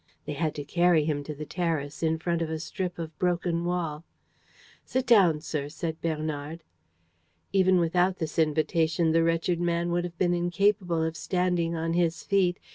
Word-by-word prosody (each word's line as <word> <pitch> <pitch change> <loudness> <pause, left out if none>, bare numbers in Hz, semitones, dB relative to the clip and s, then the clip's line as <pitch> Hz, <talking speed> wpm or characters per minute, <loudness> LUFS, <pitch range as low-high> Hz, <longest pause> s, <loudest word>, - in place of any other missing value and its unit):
They - - -4
had 155 +1 -1
to 145 - -4
carry 170 0 +3
him 145 -2 -1
to 150 - -5
the 150 +1 -6
terrace, 160 -4 -2
in 160 -1 +1
front 170 +1 -1
of 165 - -1
a 160 - -2
strip 175 +3 -4
of 165 -2 -6
broken 175 -1 0
wall. 165 -3 -2 0.8
"Sit 260 0 -1
down, 190 -10 +5
sir," 150 -3 -3
said 160 +1 -5
Bernard. 155 0 -3 0.9
Even 185 -1 +4
without 180 +2 +2
this 160 -1 -3
invitation, 160 +1 +2
the 165 +1 +4
wretched 165 +1 +1
man 170 0 0
would 175 0 +1
have 175 -1 -6
been 175 -1 +2
incapable 175 -1 +1
of 160 0 -2
standing 180 -2 0
on 165 0 -1
his 170 -1 0
feet. 190 -3 +2
170 Hz, 175 wpm, -27 LUFS, 160-175 Hz, 0.9 s, down